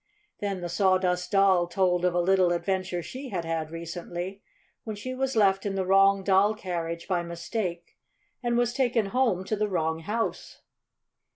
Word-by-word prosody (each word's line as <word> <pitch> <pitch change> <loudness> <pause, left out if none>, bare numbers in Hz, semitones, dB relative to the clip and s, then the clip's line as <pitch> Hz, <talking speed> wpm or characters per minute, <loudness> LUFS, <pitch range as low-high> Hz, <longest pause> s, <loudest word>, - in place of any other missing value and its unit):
Then 200 -3 -3
the 175 - -3
Sawdust 185 0 +1
Doll 195 -3 +4
told 180 0 +1
of 180 -1 +1
a - - +3
little 185 0 +3
adventure 185 -1 -2
she 260 - -7
had 175 -6 -3
had 165 -1 -2
recently, 175 +3 -6 0.4
when 220 -2 -5
she 255 +5 -5
was 265 0 -2
left 195 -3 +3
in 200 -1 -2
the 190 -1 -1
wrong 195 +1 +4
doll 200 +2 +3
carriage 170 -4 -4
by 180 -3 +1
mistake 170 +1 -5 0.4
and 240 -2 0
was 240 0 +1
taken 240 -6 +1
home 235 -8 +2
to 215 - -2
the 210 0 -1
wrong 160 -3 -1
house. 215 +7 -4
190 Hz, 170 wpm, -27 LUFS, 175-210 Hz, 0.4 s, Doll